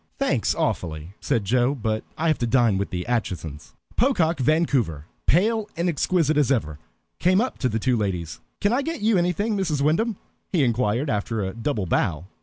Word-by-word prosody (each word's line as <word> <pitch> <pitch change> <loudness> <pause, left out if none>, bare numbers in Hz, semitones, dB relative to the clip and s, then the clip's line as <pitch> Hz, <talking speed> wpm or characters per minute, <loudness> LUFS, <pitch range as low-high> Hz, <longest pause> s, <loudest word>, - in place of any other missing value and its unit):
"Thanks, - - +1
awfully," 80 +1 -2
said 110 -4 0
Joe, 125 +6 +2
"but 110 -3 -2
I 165 - 0
have 155 - +2
to 120 - 0
dine 115 -5 +3
with 100 - -2
the 90 -1 -4
Aitchisons." 90 -11 -3 0.2
Pocock 180 - +2
Vancouver, 130 - +1 0.2
pale 215 +6 +2
and 170 +1 0
exquisite 160 -1 +1
as 145 -2 +3
ever, 80 - -1 0.4
came 185 +2 +4
up 250 +3 -1
to 125 - +1
the 110 - -1
two 125 +3 +1
ladies. 90 -6 -3 0.2
"Can 205 +3 +2
I 260 - +2
get 325 +1 -4
you 210 -3 +3
anything, 190 +5 0
Mrs. 165 -8 0
Wyndham?" 195 +8 +1 0.3
he 170 -7 +3
inquired, 120 +2 +1
after 105 +1 -1
a 95 0 -3
double 115 -3 -2
bow. 85 -1 0
130 Hz, 185 wpm, -24 LUFS, -, 0.4 s, came